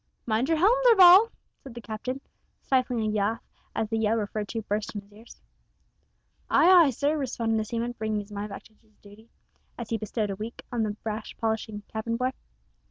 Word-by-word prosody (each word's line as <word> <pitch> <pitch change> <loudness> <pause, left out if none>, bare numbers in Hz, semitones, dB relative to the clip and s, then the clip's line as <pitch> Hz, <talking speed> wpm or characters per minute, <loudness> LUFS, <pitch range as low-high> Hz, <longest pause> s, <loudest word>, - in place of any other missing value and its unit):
"Mind 235 +5 0
your 325 - +2
helm, 400 +9 +5
Darvall," 395 -2 +8 0.3
said 265 -3 -12
the - - -6
Captain, 235 +5 -5 0.4
stifling 255 -3 +1
a 215 - 0
laugh 215 +3 -1 0.3
as 220 - -1
the 225 +1 -2
yell 220 0 +2
referred 210 -1 -3
to 225 +2 -4
burst 210 +1 -3
on 205 - -5
his 200 +1 -23
ears. 220 +3 -16 1.1
"Ay, 360 - +5
ay, - - +2
sir," 285 +4 0
responded 235 -6 -1
the 215 - -2
seaman, 235 +2 -3
bringing 215 -1 -1
his 205 +1 -14
mind 205 +1 -5
back 200 - -8
to 220 - -21
his 215 -2 -31
duty, 210 +3 -16 0.5
as 235 -2 -7
he 225 - 0
bestowed 215 -1 -2
a - - -4
wink 220 +4 -7
on 240 -2 -1
the 210 -1 -2
brass 215 0 -4
polishing 220 -2 -3
cabin 230 +1 -3
boy. 255 +1 0
225 Hz, 200 wpm, -27 LUFS, 215-250 Hz, 1.1 s, Darvall